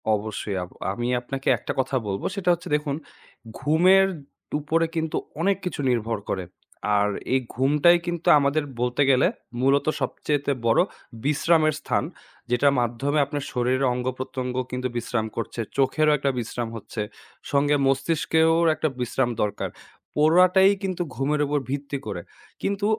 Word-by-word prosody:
অবশ্যই। 105 -1 -4
আব 90 - -9 0.2
আমি 120 +3 -3
আপনাকে 135 +2 -6
একটা - - -5
কথা 130 +1 0
বলব। 100 -1 -2
সেটা 195 -3 -1
হচ্ছে 175 +1 -6
দেখুন, 150 -1 -1 0.6
ঘুমের 185 +6 +5 0.5
উপরে 160 +3 +1
কিন্তু 160 -1 -1 0.2
অনেক 195 +2 +2
কিছু 175 -5 -3
নির্ভর 115 -2 0
করে। 95 -2 -2 0.5
আর 100 0 +2 0.2
এই 130 - +4 0.2
ঘুমটাই 150 +7 +4
কিন্তু 175 -1 -3
আমাদের 140 +2 +1 0.2
বলতে 125 +3 0
গেলে 130 0 +5 0.3
মূলত 135 +2 +3 0.2
সবচাইতে 145 +2 -1 0.2
বড় 115 - +5 0.4
বিশ্রামের 155 +1 +3
স্থান। - - 0 0.5
যেটার 140 +3 +3
মাধ্যমে 120 +5 0
আপনার 145 0 -4
শরীরে 130 +2 +1
অঙ্গ-প্রত্যঙ্গ 125 0 -3 0.2
কিন্তু 125 0 -2
বিশ্রাম 120 -1 -1
করছে, 115 - -4 0.2
চোখেরও 150 +3 +3
একটা 140 0 0
বিশ্রাম 120 0 -4
হচ্ছে, 110 0 -6 0.5
সঙ্গে 145 +1 +3
মস্তিষ্কেরও 165 +3 +2
একটা 155 - 0
বিশ্রাম 125 +1 0
দরকার। 105 -1 -1 0.5
পুরাটাই 180 +5 +5
কিন্তু 185 -2 -2
ঘুমের 145 +2 0
উপর 145 +1 0
ভিত্তি 140 +1 -3
করে। 85 - -4 0.4
কিন্তু 200 +1 -1
140 Hz, 140 wpm, -24 LUFS, 125-160 Hz, 0.6 s, ঘুমের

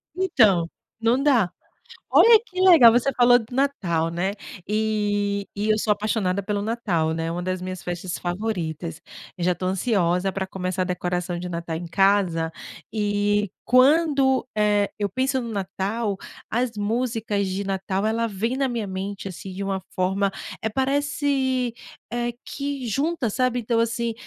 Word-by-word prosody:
Então, 215 - +3 0.3
não 235 +4 +2
dá. 245 -11 +3 0.6
Olha 455 -1 +8
que 370 -5 -8
legal! 330 -12 +8
Você 250 +4 +2
falou 245 0 +6
do 225 +2 -10
Natal, 180 - 0
né. 175 +3 -1 0.4
E 205 -2 0
e 210 +2 -1
eu 215 - +4
sou 215 0 +1
apaixonada 205 -2 -1
pelo 205 +1 -2
Natal, 195 -8 0
né, 165 0 -2
uma 175 +1 -3
das 185 0 -2
minhas 185 -1 -6
festas 175 0 -4
favoritas. 175 -4 -3 0.4
Eu 175 - -3
já 180 - +3
tô 185 - -5
ansiosa 185 -2 +1
pra 190 0 -3
começar 185 -1 -3
a - - -3
decoração 180 -1 -2
de 180 - -5
Natal 170 -1 -4
em 175 - -5
casa, 185 -4 +2 0.4
e 205 -1 +1
quando, 265 0 +4
eh, 205 -1 +2
eu 205 -1 0
penso 260 +6 0
no 235 - -5
Natal 200 +1 -2 0.3
as 240 +1 0
músicas 215 -1 -1
de 190 +2 -2
Natal, 190 0 -2
ela 230 +1 0
vem 225 +5 -2
na 270 -1 +1
minha 235 -5 -3
mente, 195 +1 -5
assim, 190 +1 -8
de 195 +2 -4
uma 195 -1 -1 0.2
forma, 195 +2 +1 0.3
eh, 220 - 0
parece, 270 -1 0 0.4
eh, 240 0 -1
que 280 -3 -4
junta, 275 +1 0
sabe. 250 +2 0
Então 230 0 0
assim, 230 0 0
205 Hz, 160 wpm, -24 LUFS, 185-245 Hz, 0.6 s, Olha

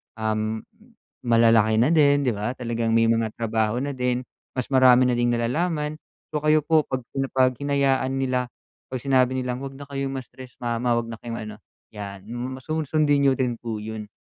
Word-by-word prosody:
um, 110 0 -2 0.6
malalaki 115 -2 +4
na 125 - +4
din, 145 -2 +4
'di 115 - +1
ba? 105 +3 -2
Talagang 115 -2 -2
may 115 0 +4
mga 115 -1 +1
trabaho 110 0 0
na 140 +1 -2
din, 125 -1 0 0.4
mas 130 - -1
marami 130 -1 +6
na 125 - +2
ding 120 0 +2
nalalaman. 150 +6 -1 0.4
So, 150 0 -2
kayo 155 0 +5
po 160 -2 +4
'pag 130 -1 -2 0.3
'pag 130 -1 +3
hinayaan 140 -2 +1
nila, 125 -2 -1 0.4
'pag 130 - -3
sinabi 130 -1 +2
nilang 125 +1 -3
'wag 135 - -5
na 140 0 -10
kayong 135 -1 -3
ma-stress, 130 0 -12
mama. 120 0 0
Huwag 115 - -5
na 115 - -5
kayong 115 -1 -5
ano, 105 - -8 0.4
'yan 100 -1 -8 0.3
masu 155 +5 -4
sun 160 -1 -1 0.2
sundin 145 -1 +3
n'yo 135 - +5
din 125 -2 0
po 115 -3 -4
'yon. 110 0 -6
125 Hz, 185 wpm, -24 LUFS, 115-135 Hz, 0.6 s, marami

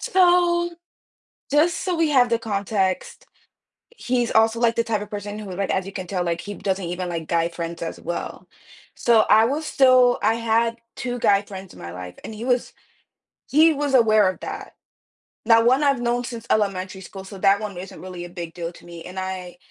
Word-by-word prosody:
So, 350 -2 +3 0.8
just 310 +4 +3
so 365 -2 -1
we 325 -2 +2
have 255 -4 +4
the 230 -1 +1
context, 200 -3 -2 0.7
he's 245 - -1
also, 225 +1 +3
like, 235 -1 +2
the 230 - +1
type 225 -2 -1
of 210 - -7
person 205 0 -6
who, 205 -3 -7
like 195 +1 -2
as 190 -1 0
you 195 - -7
can 185 -2 -6
tell, 180 -1 -1
like, 170 -1 -2
he 205 - -7
doesn't 195 -1 -2
even 180 +1 -4
like 165 -2 -4
guy 170 0 +1
friends 170 0 -6
as 165 - -5
well. 175 - -5 0.5
So 235 -2 +4
I 220 +1 +6
was 290 +6 -1
still 255 -3 +4
I 225 - +3
had 230 0 +1 0.2
2 245 0 -4
guy 200 -3 +4
friends 195 -2 -10
in - - -14
my 85 - -7
life, 90 0 -8
and - - -7
he 220 +2 -7
was 250 -1 0 0.8
he 315 +3 +5
was 285 -1 -2
aware 215 -5 +5
of 185 - -6
that. - - -7 0.7
Now, 230 -1 +6
one 260 +4 +4
I've 275 -3 +2
known 240 0 0
since 235 -2 -7
elementary 190 -2 0
school, 190 +1 -9
so 195 +1 -10
that 195 +1 +4
1 205 -4 -5
isn't 180 -3 -9
really 180 -1 -7
a - - -9
big 170 -2 -7
deal 170 -1 -5
to - - -16
me. 170 -1 -10
And 185 +1 -10
I 185 -2 -5
210 Hz, 205 wpm, -23 LUFS, 185-245 Hz, 0.8 s, I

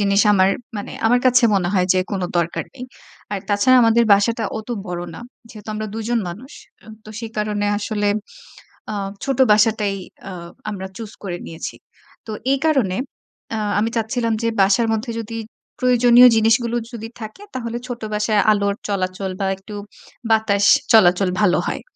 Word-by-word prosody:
জিনিস 200 0 +3
আমার 190 -1 +4 0.3
মানে 205 - -6
আমার 245 +2 +4
কাছে 250 0 +5
মনে 185 -3 +1
হয় 180 -1 +2
যে 185 - +3
কোন 195 -3 -2 0.2
দরকার 170 0 -1
নেই। 250 -1 -7 0.5
আর 200 - -1
তাছাড়া 230 +6 +4
আমাদের 230 +1 +4
বাসাটা 225 +3 +2
অত 220 - -10 0.2
বড় 175 -1 -4
না। - - -9 0.3
যেহেতু 215 -2 -12
আমরা 215 0 -3
২ 225 - -4
জন 240 -1 +1
মানুষ। 225 +11 -9 0.3
অ্যা - - -18 0.2
তো 215 - -11
সে 230 - -5
কারনে 210 -1 -1
আসলে 205 -1 -1 0.8
আ - - -4 0.3
ছোট 270 -2 -1
বাসাটাই 210 -2 +3 0.3
আ - - -6 0.4
আমরা 190 -2 -5
চুজ 220 -2 -7
করে 175 -3 -4
নিয়েছি। 160 - -7 0.5
তো 220 - -7 0.2
এ - - +5
কারনে 255 -12 +2 0.6
আ - - -2 0.2
আমি 225 +2 +1
চাচ্ছিলাম 230 +1 -1
যে - - +1
বাসার 215 +4 +3
মধ্যে 225 +2 -3
যদি 230 0 -6 0.4
প্রয়োজনীয় 245 -1 +6
জিনিসগুলো 225 +2 +2 0.2
যদি 225 -1 -6
থাকে, 220 - -8
তাহলে 235 -2 -4
ছোট 245 -2 -6
বাসায় 210 0 +2
আলোর 200 -1 +1
চলাচল 190 -1 -2
বা 195 - -1
একটু 195 +2 -12 0.6
বাতাস 210 -2 +2 0.3
চলাচল 185 -3 +5
ভালো 190 -4 +3
হয়। - - -3
215 Hz, 165 wpm, -20 LUFS, 200-230 Hz, 0.8 s, প্রয়োজনীয়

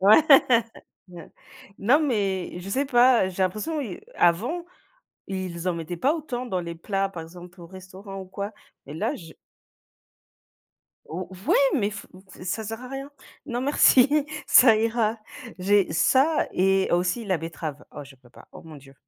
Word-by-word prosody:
Ouais. 200 +3 +7 1.6
Non 255 +10 +3
mais, 200 - -1
je 185 - -9
sais 270 +8 -1
pas, 245 -6 +4
j'ai 190 +1 -3
l'impression 215 - -2
ils 265 - -6
avant, 240 - +1 0.6
ils 185 -2 -5
en 180 - +1
mettaient 170 +1 -6
pas 275 - +1
autant 255 -6 -5
dans 190 -6 -2
les 170 -1 -7
plats 195 +3 -2
par 175 -4 -8
exemple 175 +2 -13
au 170 - -11
restaurant 190 +2 -10
ou - - -9
quoi 200 +2 -6 0.3
et - - -9
là 160 - -2
j 165 -3 -13 1.7
ou 175 +2 -6 0.2
ouais - - +4 0.2
mais 205 -1 0
f 205 - -9 0.3
ç - - -13
ça 205 +4 -3
sert 225 +2 -6
à 255 - -9
rien. 270 +1 -7 0.4
Non 245 -3 -3
merci, 270 -1 +5 0.4
ça 230 -4 +7
ira. 225 0 0 0.4
J'ai 200 +1 +2
ça 270 - +2
et 195 +1 +2
aussi 180 +7 0
la 190 -4 0
betterave. 160 -2 -7
Oh, 145 - -8
je 135 0 -16
peux 125 -1 -23
pas. - - -17
Oh, - - -12
mon 160 -2 -12
dieu. 135 -1 -16
195 Hz, 165 wpm, -24 LUFS, 175-240 Hz, 1.7 s, Ouais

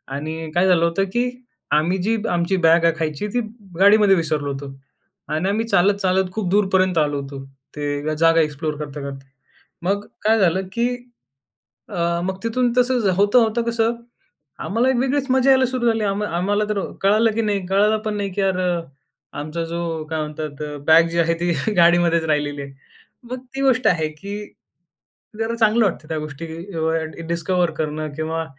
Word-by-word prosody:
आणि 160 +2 -5
काय 180 +2 +3
झालं 175 -2 +4
होतं 170 +4 +1
की? 245 +1 +1 0.4
आम्ही 155 +5 +2
जी 225 +3 +1
आमची 175 +2 +1
बॅग 165 +1 +5
आहे 165 - +4
खायची. 155 +5 -2
ती 245 +4 -1 0.4
गाडीमध्ये 205 0 +6
विसरलो 155 -4 -1
होतो 135 0 -7 0.6
आणि 155 +5 -1
आम्ही 220 +3 0
चालत-चालत 190 -1 +2
खूप 210 -3 -2
दूरपर्यंत 190 -2 +2
आलो 145 -2 +1
होतो. 135 0 -8 0.3
ते 145 +1 -2
जागा 165 +1 +4
एक्सप्लोर 150 0 -2
करता-करता. 140 -2 -7 0.6
मग 200 +3 -1 0.2
काय 220 +1 +3
झालं 190 0 +2
की? 235 +1 +1 1.0
अ, 170 0 -1
मग 190 +1 -3
तिथून 240 +2 +1
तसं 245 -5 +3
होता-होता 220 +3 +3
कसं 230 0 +1 0.7
आम्हाला 235 +5 +1
एक 265 - +2
वेगळीच 270 +2 0
मजा 260 +1 +3
यायला 260 -1 +5
सुरू 250 -1 -1
झाली. 225 -1 +1
आम्हा 205 +1 -1
आम्हाला 205 +4 +1
तर 210 -1 0 0.2
कळालं 215 +3 +3
की 230 - 0
नाही, 205 -3 -1
कळालं 205 +3 +3
पण 215 -1 -1
नाही 200 -1 -2
की 200 - -1
यार 190 -1 +1 0.8
आमचा 155 +3 -4
जो 165 -1 -3
काय 160 -1 -2
म्हणतात? 150 -1 -5 0.2
बॅग 165 +1 +6
जी 170 +1 -1
आहे 165 0 +3
ती 175 0 +1 0.3
गाडीमध्येच 170 -1 +4
राहिलेली 145 -2 -1
आहे. 140 0 -10 0.5
मग 245 +2 -6 0.2
ती 270 - -2
गोष्ट 260 -2 +3
आहे, 160 -3 +2
की 200 +7 -8 0.9
जरा 225 +1 -1
चांगलं 225 0 +3
वाटतं 165 -5 -2
त्या 160 - -2
गोष्टी 150 +1 -7 0.3
एवढ्या 160 0 -2
डिस्कव्हर 170 +1 0
करणं 155 0 -3
किंवा 160 +1 -2
180 Hz, 165 wpm, -21 LUFS, 160-210 Hz, 1.0 s, गाडीमध्ये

